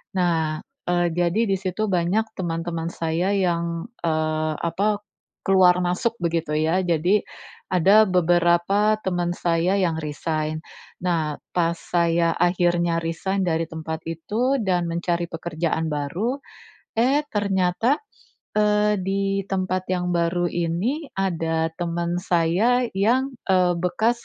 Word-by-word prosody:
Nah, 160 -4 +1 0.3
eee, 175 0 +2
jadi 175 +5 +2
di 195 - +3
situ 185 +2 -4
banyak 185 +4 +1
teman-teman 165 -1 -3
saya 170 +4 0
yang, 170 -1 -1 0.2
eee, 155 -1 0
apa 200 +5 0 0.4
keluar 180 -2 +5
masuk 180 +6 0
begitu 165 -2 -1
ya. 160 +4 +2
Jadi 175 +5 +2 0.5
ada 200 +5 +6
beberapa 180 +4 +3
teman 175 -3 -1
saya 170 +2 +1
yang 170 -4 +1
resign. 155 0 -3 0.4
Nah, 160 -4 0 0.2
pas 170 -1 +2
saya 170 -1 +1
akhirnya 175 -1 +2
resign 180 +4 -2
dari 165 -1 0
tempat 160 0 -5
itu 225 - 0
dan 180 -3 +1
mencari 170 0 -1
pekerjaan 165 0 -2
baru, 165 - -2 0.6
eh 270 +5 +3
ternyata, 200 +5 +1 0.6
eee, 210 -1 +3
di 195 +1 -1 0.2
tempat 185 -1 -1
yang 180 -1 -1
baru 175 +1 +1
ini, 185 - -1
ada 165 -4 0
teman 170 0 -1
saya 185 +9 +2
yang, 250 +7 +2 0.2
eee, 180 -2 +4
bekas 220 +7 0
175 Hz, 120 wpm, -23 LUFS, 165-195 Hz, 0.6 s, ada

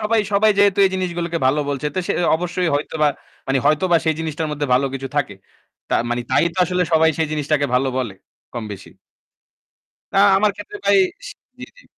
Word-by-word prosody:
সবাই 220 +1 +1
সবাই 215 +2 +4
যেহেতু 200 -1 +4
এই 190 - +3
জিনিসগুলোকে 175 -2 -2
ভালো 145 +3 +2
বলছে। 140 +1 -2
তো - - -2
সে - - 0 0.2
অবশ্যই 180 +1 -2
হয়তোবা 150 +1 0 0.4
মানে 135 0 +1
হয়তোবা 165 +4 +3
সেই 160 -1 +1
জিনিসটার 155 0 -3
মধ্যে 145 -1 -2
ভালো 140 +2 +2
কিছু 135 0 -4
থাকে। 135 -9 0 0.6
তা - - +2 0.2
মানে 120 0 -1
তাই - - +3
তো 185 - -7
আসলে 180 +1 0
সবাই 160 0 +5
সেই 160 -2 0
জিনিসটাকে 150 -1 0
ভালো 130 +1 +2
বলে, 115 -7 -3 0.4
কমবেশি। 105 -5 -7 1.2
না - - +1 0.2
আমার 210 +2 +3
ক্ষেত্রে 310 - -9
ভাই - - +5 0.3
সি - - -9 0.2
জ্বী, - - -7
জ্বী, - - -18
160 Hz, 185 wpm, -20 LUFS, 140-185 Hz, 1.2 s, সবাই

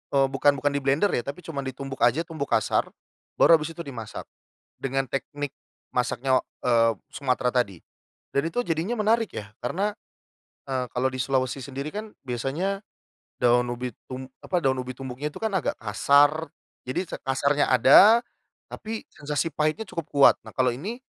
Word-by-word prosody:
eee, 135 -1 +5
bukan 140 +1 +3
bukan 145 +2 +1
diblender 140 +7 +2
ya 120 - +1
tapi 140 +6 -6
cuman 140 -4 -4
ditumbuk 135 0 -6
aja, 125 +8 +4
tumbuk 155 -4 -5
kasar, 110 - +1 0.5
baru 165 - +7
habis 155 +2 -5
itu 170 - -6
dimasak 115 -6 -7 0.5
dengan 135 0 -1
teknik 140 +2 -4 0.4
masaknya, 130 +1 +1 0.3
eee, 115 -2 +4 0.2
Sumatera 125 -3 0
tadi. 110 -8 0 0.6
Dan, 140 +4 +1
itu 205 +9 -1
jadinya 165 +6 -1
menarik 220 +1 +2
ya, 105 -1 -7
karena, 200 +11 -1 0.7
eee, 130 -2 -1
kalau 130 +1 +2
di 130 - -6
Sulawesi 130 0 0
sendiri 140 +2 -5
kan, 210 +4 -6
biasanya 135 +10 -2 0.6
daun 120 0 +3
ubi 120 0 -4 0.2
tum 130 0 -5 0.2
apa, 180 - -1
daun 130 -5 +1
ubi 125 0 -6
tumbuknya 135 +2 -4
itu - - -9
kan 220 -2 -2
agak - - 0
kasar, 145 +8 +3 0.3
jadi 130 +9 -2
ce - - -6
kasarnya 140 +2 +1
ada 200 - +7 0.5
tapi 220 0 -6
sensasi 150 +2 -2
pahitnya 155 +9 0
cukup 165 -4 -5
kuat. 140 -1 +7
Nah, - - -11
kalau 130 -1 +2
ini, 210 - -5
140 Hz, 160 wpm, -26 LUFS, 125-165 Hz, 0.7 s, baru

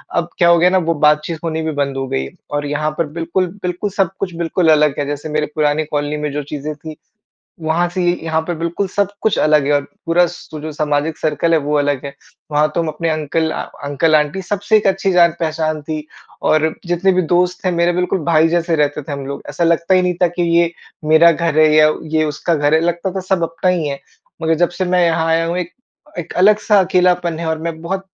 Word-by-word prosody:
अब 170 0 0
क्या 170 -1 +4
हो 170 - +6
गया 180 +2 +4
ना 190 - +2
वो - - +2
बातचीत 155 +2 +1
होनी 160 -1 -2
भी 160 0 -2
बंद 140 -1 -2
हो 135 0 -3
गयी 65 - -2
है - - -10 0.2
और 145 0 -2
यहाँ 150 +1 -1
पर 170 - +1
बिल्कुल, 175 +3 -1 0.2
बिल्कुल 180 +3 -2
सब 195 -2 0
कुछ 180 -4 -3
बिल्कुल 170 0 0
अलग 150 -2 +3
है। 145 - 0
जैसे 145 +2 -5
मेरे 150 0 0
पुरानी 150 0 +1
कॉलोनी 145 0 -1
में 150 -1 -3
जो 145 0 -3
चीज़ें 150 +1 -5
थीं 155 +1 -9 0.7
वहाँ 165 +3 +1
से 180 0 -2
ये 175 - +3
यहाँ 160 0 0
पे 175 +2 -4
बिल्कुल 170 +4 -2
सब 200 +1 0
कुछ 220 - +1
अलग 150 -2 +3
है 145 - +1
और 145 - +3 0.2
पूरा 175 +1 +4
सु 170 -3 -10
जो 155 +1 -6
सामाजिक 150 +1 -1
सर्कल 155 +2 0
है - - +5
वो 150 0 0
अलग 145 -1 -1
है। 140 - -6 0.4
वहाँ 150 +1 +2
तो 170 - +2
हम 165 - -3
अपने 160 +2 -2
अंकल 155 +1 -1
अ, - - -3 0.2
अंकल-आंटी 150 +4 +1
सबसे 205 +3 +1
एक 205 - 0
अच्छी 195 0 +1
जान-पहचान 165 -3 +1
थी 155 0 -5 0.4
और 155 0 +3 0.2
जितने 175 +2 +1
भी 185 - +2
दोस्त 180 +1 +1
थे 185 - +2
मेरे 170 0 +2
बिल्कुल 180 +1 0
भाई 165 -1 +4
जैसे 170 -1 +1
रहते 150 0 0
थे 145 - -9
हम 140 -1 -5
लोग। 140 - -6
ऐसा 170 - -2
लगता 170 +2 +2
ही 185 - +5
नहीं 180 0 0
था 180 - +5
कि 175 +1 -4 0.2
ये 170 0 +3 0.4
मेरा 170 +1 +7
घर 165 -1 0
है 155 0 +6
या 155 0 +6 0.3
ये 155 - +3
उसका 155 +3 -1
घर 145 0 +1
है। 160 - +5
लगता 175 +2 -1
था - - -1
सब 185 -3 +2
अपना 165 +2 -1
ही 165 -4 -1
है। 140 -1 -4 0.4
मगर 160 0 +2
जब - - -8
से 185 - +1
मैं 180 0 +2
यहाँ 165 -1 +1
आया 165 0 +2
हूँ 170 +2 -2
एक, 180 -1 -4 0.5
एक 170 - -7
अलग-सा 210 +1 +4
अकेलापन 180 -2 +1
है 170 - -4
और 160 0 -1
मैं 160 -1 -6
बहुत 190 +3 -4
165 Hz, 240 wpm, -17 LUFS, 150-175 Hz, 0.7 s, मेरा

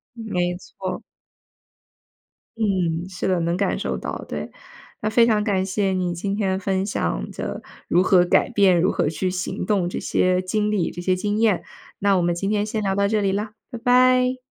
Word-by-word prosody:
没 180 -6 -2
错。 185 +1 -6 1.6
嗯， 180 -5 0
是 185 -1 -4
的， 185 -2 +2
能 170 +1 0
感 195 +2 0
受 - - -2
到， - - -5
对。 - - -5 0.5
那 215 - -1
非 230 +1 +5
常 215 -2 +2
感 200 -3 +1
谢 195 +1 0
你 180 -2 -1
今 195 +3 -2
天 190 -2 0
分 190 0 0
享 - - -2
的 - - -5 0.3
如 175 - +3
何 185 -1 +4
改 - - +3
变、 195 -6 +4
如 185 - +3
何 - - 0
去 175 +4 -2
行 185 +1 -3
动 195 -4 +1
这 175 - -4
些 185 0 +1
经 210 +3 -1
历、 195 -5 0
这 - - -9
些 185 0 +2
经 205 +3 -1
验， 215 -5 +2 0.4
那 200 0 +3
我 - - +2
们 175 0 +1
今 195 +3 -2
天 210 -1 +1
先 215 0 -3
聊 195 -2 0
到 200 0 +2
这 215 0 +1
里 195 -1 +1
啦， 210 +2 -3 0.2
拜 240 - -6
拜。 250 +1 +4
195 Hz, 210 characters per minute, -23 LUFS, 180-210 Hz, 1.6 s, 非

